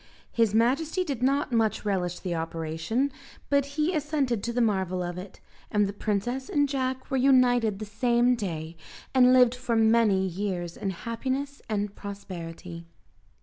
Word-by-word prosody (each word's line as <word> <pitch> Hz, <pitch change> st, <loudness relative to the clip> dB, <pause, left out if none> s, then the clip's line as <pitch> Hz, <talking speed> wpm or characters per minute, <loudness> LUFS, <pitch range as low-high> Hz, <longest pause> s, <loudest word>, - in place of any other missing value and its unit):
His 225 Hz, -3 st, +2 dB
majesty 280 Hz, -, +2 dB
did 275 Hz, -8 st, -4 dB
not 275 Hz, +2 st, +1 dB
much 225 Hz, -2 st, +1 dB
relish 180 Hz, -3 st, -1 dB
the 180 Hz, -2 st, -2 dB
operation, 165 Hz, -, -2 dB, 0.4 s
but 280 Hz, -1 st, +3 dB
he 310 Hz, +4 st, +2 dB
assented 290 Hz, -, 0 dB
to 235 Hz, -, -2 dB
the 240 Hz, -, -1 dB
marvel 190 Hz, -5 st, +1 dB
of 175 Hz, 0 st, -4 dB
it, 185 Hz, +2 st, -9 dB, 0.3 s
and 210 Hz, -1 st, +2 dB
the 200 Hz, -, -3 dB
princess 220 Hz, +6 st, -2 dB
and 290 Hz, -1 st, +2 dB
Jack 260 Hz, -1 st, -3 dB
were 270 Hz, -, +2 dB
united 245 Hz, -5 st, +4 dB
the 215 Hz, -, -5 dB
same 240 Hz, +3 st, +2 dB
day, 170 Hz, -8 st, -4 dB, 0.4 s
and 255 Hz, -1 st, +6 dB
lived 250 Hz, -2 st, +6 dB
for 250 Hz, -2 st, -2 dB
many 220 Hz, -4 st, +4 dB
years 180 Hz, -2 st, -3 dB
in 195 Hz, -, -3 dB
happiness 260 Hz, +8 st, -3 dB
and 205 Hz, -1 st, -2 dB
prosperity. 170 Hz, -4 st, -8 dB
225 Hz, 155 wpm, -27 LUFS, 190-260 Hz, 0.4 s, and